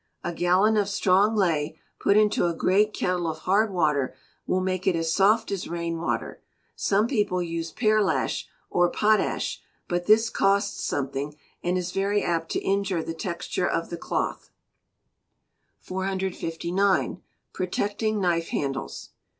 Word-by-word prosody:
A 175 - -3
gallon 185 +6 +3
of 200 -1 +1
strong 200 +2 +3
ley, 165 -7 0 0.2
put 200 - +3
into 210 -4 +3
a 170 - -1
great 205 +5 +3
kettle 180 -4 -1
of 160 -1 -3
hard 205 +3 +2
water, 150 -7 +1 0.3
will 185 - +1
make 185 +1 -2
it 185 - +4
as 165 0 0
soft 205 +5 +3
as 195 -3 -3
rain 170 -1 -3
water. 170 - -3 0.3
Some 205 +2 +2
people 205 -7 0
use 165 -1 -4
pearlash, 215 -4 +1 0.2
or 175 0 +3
potash; 215 +3 +1 0.3
but 175 0 -2
this 220 +2 +5
costs 200 +1 +1
something, 140 +1 -2 0.3
and 180 +1 0
is 180 0 -3
very 200 +2 0
apt 165 -1 -1
to - - +1
injure 195 -4 0
the 165 - -4
texture 170 +1 -2
of 165 - -2
the - - -2
cloth. - - -3 1.3
459. 190 0 -1 0.3
Protecting 205 +4 -1
Knife 170 -3 +1
Handles. 135 -1 -4
185 Hz, 140 wpm, -26 LUFS, 170-200 Hz, 1.3 s, this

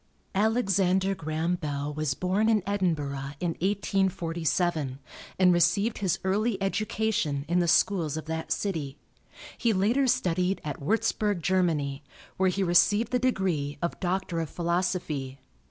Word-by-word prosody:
Alexander 195 -3 +2
Graham 160 0 -2
Bell 145 -3 -3
was 150 -3 -1
born 195 +4 +1
in 215 -4 +3
Edinburgh 150 -8 -1
in 175 -2 -1
1847, 175 -6 0 0.4
and 180 -1 +5
received 180 +6 +2
his 190 -5 0
early 200 +2 0
education 195 -7 -1
in 175 +1 +2
the 175 - +1
schools 170 -3 +2
of 155 - -5
that 160 0 -4
city. 155 -8 -2 0.6
He 230 -2 +2
later 230 +8 +2
studied 180 -3 +1
at 150 -2 -5
Warzburg, 205 +1 0
Germany, 155 -7 0 0.3
where 190 0 +3
he 190 +2 0
received 205 +5 +3
the 250 - +2
degree 185 - 0
of 170 - -3
Doctor 180 -2 -1
of 160 -2 -3
Philosophy. 170 -6 -2
180 Hz, 135 wpm, -27 LUFS, 155-195 Hz, 0.6 s, and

